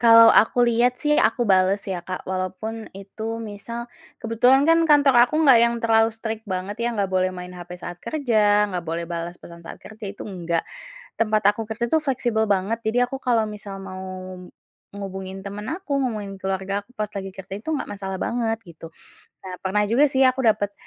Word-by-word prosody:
Kalau 230 -1 +8
aku 245 +2 +4
lihat 240 +2 +2
sih 300 0 +2
aku 240 +2 +2
bales 190 0 +3
ya, 185 -3 -3
Kak, 185 +1 -6
walaupun 190 +4 -4
itu 220 +3 -6
misal 225 +3 -6 0.4
kebetulan 245 +5 +3
kan 330 0 +6
kantor 285 -3 +5
aku - - -6
gak 260 -5 +7
yang 235 0 +3
terlalu 225 0 +4
strict 225 0 -5
banget 185 +2 -3
ya, 235 - +1
gak 195 -2 0
boleh 185 0 +2
main 180 0 -8
hape 180 0 -9
saat 175 0 -8
kerja, 215 -8 +2
gak 180 - -1
boleh 165 +1 -3
balas 170 +1 -5
pesan 170 0 -13
saat 165 - -9
kerja, 215 0 -11
itu 200 - -8
enggak. 170 -4 -2 0.6
Tempat 215 -2 +3
aku 225 0 -6
kerja 225 +2 -3
itu 320 - +4
fleksibel 240 -6 0
banget 200 +4 0
jadi 245 +3 +2
aku 270 +1 -6
kalau 235 -3 +2
misal 205 -2 -7
mau 185 0 -7 0.9
ngubungin 190 -1 -6
temen 205 +1 -6
aku, 315 -5 -2
ngubungin 210 -5 -3
keluarga 195 +1 -2
aku 235 - -32
pas 210 - 0
lagi 195 -1 -5
kerja 195 0 -9
itu 315 - -4
gak 300 - -2
masalah 195 -2 -5
banget 225 0 -1 0.2
gitu. 165 0 -11 0.5
Nah 185 -1 -6
pernah 210 +2 +1
juga 255 +8 +3
sih 265 0 +3
aku 255 +1 +3
dapet 210 -2 +2
210 Hz, 190 wpm, -23 LUFS, 190-235 Hz, 0.9 s, Kalau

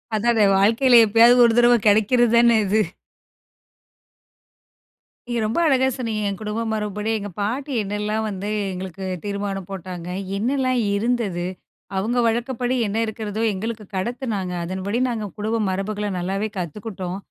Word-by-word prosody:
அதான, 225 -1 +3
வாழ்க்கையில 230 +4 +5
எப்பயாவது 235 +3 +6
ஒரு 230 -1 +3
தடவ 240 0 +6
கிடைக்கிறது 220 +3 +4
தானே 235 -1 +5
இது. 215 +3 +2 2.5
நீங்க 240 -1 -1
ரொம்ப 225 +10 -1
அழகாக 265 -3 +3
சொன்னீங்க, 225 -4 -3
என் 195 -1 -3
குடும்ப 215 +1 -3
மரபுபடி 210 0 -3
எங்க 205 0 -6
பாட்டி 255 +8 -2
என்னெல்லாம் 210 +2 -2
வந்து 200 -1 -5 0.2
எங்களுக்கு 185 0 -7 0.2
தீர்மானம் 200 -2 -3
போட்டாங்க. 180 -2 -7 0.3
என்னலாம் 255 +2 0
இருந்தது. 205 -5 -1 0.5
அவங்க 230 +6 -1
வழக்கப்படி 240 +2 -1
என்ன 205 +2 -3
இருக்கிறதோ 220 -1 -4
எங்களுக்கு 215 +2 -5
கடத்துனாங்க, 205 -3 -3
அதன்படி 190 +6 -3
நாங்க 220 -3 -3
குடும்ப 220 +2 -1
மரபுகள 205 +2 -2
நல்லாவே 195 +4 -2
கத்துக்கிட்டோம். 185 +1 -5
215 Hz, 125 wpm, -22 LUFS, 195-235 Hz, 2.5 s, எப்பயாவது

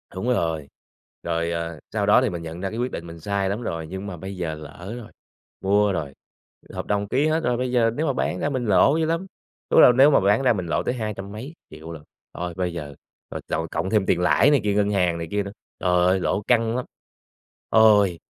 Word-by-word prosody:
Đúng 95 +6 -3
rồi, 80 - -1 0.5
rồi, 85 0 -1
à, 85 -1 -4
sau 105 -2 0
đó 105 +5 +5
thì 130 - +1
mình 85 -3 -5
nhận 80 +2 -7
ra 95 - -2
cái 110 - -7
quyết 125 +1 -1
định 85 - -6
mình 85 0 -10
sai 100 +2 -1
lắm 105 +5 -3
rồi 80 -7 -4
nhưng 95 +3 -6
mà 90 - -6
bây 95 +3 -7
giờ 85 -3 -3
lỡ 90 +6 -9
rồi, 115 - -10 0.5
mua 100 +1 +3
rồi, 75 -6 -4 0.6
hợp - - -5
đồng 100 0 0
ký 135 +7 +1
hết 160 +1 0
rồi 120 -4 +1
bây 125 0 -2
giờ 115 -2 +3
nếu 155 - -1
mà 140 - +1
bán - - -2
ra 145 - 0
mình 130 -3 -2
lỗ 115 +9 +4
dữ 160 - +1
lắm. 165 +4 -2 0.4
Lúc - - +5
đó - - +10
là - - +7
nếu 135 +4 +6
mà - - +5
bán 100 +5 +3
ra 130 - +4
mình 95 -5 -3
lỗ - - 0
tới - - -1
hai 110 -4 -3
trăm 100 0 -8
mấy 125 +9 -8 0.2
triệu 80 +2 -10
lận, 80 -3 -9 0.3
thôi 90 0 -5
bây 90 -2 -1
giờ 75 -4 -7 0.4
mà - - -4
cộng 80 +1 -1
cộng 85 +3 -3
thêm 105 -2 +2
tiền 90 - +2
lãi 135 +10 +4
này 140 -6 +3
kia, 105 -1 +1
ngân 105 0 +1
hàng 90 -4 +1
này 85 0 -5
kia 100 0 0
nữa, 100 - -7 0.3
trời 90 -1 +2
ơi 95 +1 +3
lỗ 95 - 0
căng 115 -2 +2
lắm. 125 - -2 0.8
Ôi, 105 -5 +5
100 Hz, 250 wpm, -23 LUFS, 85-115 Hz, 0.8 s, đó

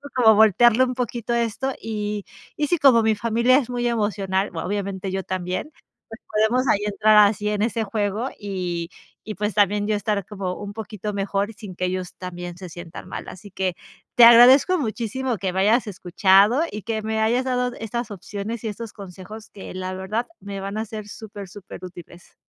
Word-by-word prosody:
como 230 -4 +6
voltearle 220 +4 +5
un 250 - -3
poquito 240 -2 -3
esto, 235 +3 -1
y 210 -2 -3 0.3
Y 295 - -1
si 350 - +2
como 260 -6 +5
mi 220 0 +3
familia 235 +4 +3
es 250 -4 -5
muy 245 -1 -2
emocional, 200 -4 0
vo 165 - -5
obviamente 195 -1 -3
yo 190 0 -2
también. 185 - -4 0.4
Pues 225 +1 -11
podemos 230 +5 +2
ahí 200 - +3
entrar 210 0 +5
así 210 0 -1
en 210 0 -1
ese 230 0 0
juego 210 +3 -2
y 180 -4 -4 0.3
y 215 - -5
pues 210 +1 -2
también 205 0 +2
yo 215 - +1
estar 205 -2 -2
como 195 -3 -4
un 205 0 -7
poquito 210 -1 -6
mejor 200 +1 -1
sin 200 -3 -10
que 185 - -1
ellos 185 0 -4
también 175 -1 -7
se 185 -1 -8
sientan 175 0 -10
mal. - - -6
Así 200 +3 -10
que 185 -1 -2 0.4
te 240 - +9
agradezco 255 +10 +8
muchísimo 240 -1 -2
que 185 0 -2
me 190 - +1
hayas 225 +4 +3
escuchado 195 - +3
y 210 - -6
que 225 0 -2
me 220 0 -1
hayas 235 +4 +2
dado 250 -1 0
estas 230 +1 -4
opciones 205 +3 -6
y - - -1
estos 220 +1 -7
consejos 200 +2 -10
que 195 - -10
la 185 0 -4
verdad, 195 +6 -3
me 200 -1 -6
van 195 +2 -5
a 220 - -1
ser 215 -1 -8
super 205 -2 -9
superútiles. 180 -2 -12
210 Hz, 190 wpm, -23 LUFS, 190-230 Hz, 0.4 s, te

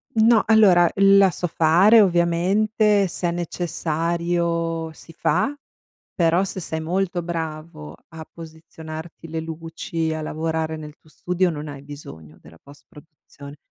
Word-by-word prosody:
No, 225 0 +4
allora 190 -6 +5
la 195 -1 +5
so 175 - -3
fare 180 +9 +5
ovviamente, 195 +4 +2
se 175 0 -2
è - - -1
necessario 170 -1 -2
si 165 +1 -15
fa, 230 - 0 0.6
però 170 +2 +2
se 190 -1 -5
sei 160 -1 -4
molto 180 +1 -2
bravo 155 - -6
a 160 -1 -9
posizionarti 160 0 -10
le 160 0 -4
luci, 160 0 -4
a 155 - -4
lavorare 160 +1 -3
nel 150 -1 -9
tuo 155 - -25
studio, 180 +2 -1
non 150 -1 -6
hai 140 -2 -9
bisogno 80 - -12
della 80 +2 -17
post 140 +1 -17
produzione. 145 -2 -14
165 Hz, 135 wpm, -22 LUFS, 160-180 Hz, 0.6 s, allora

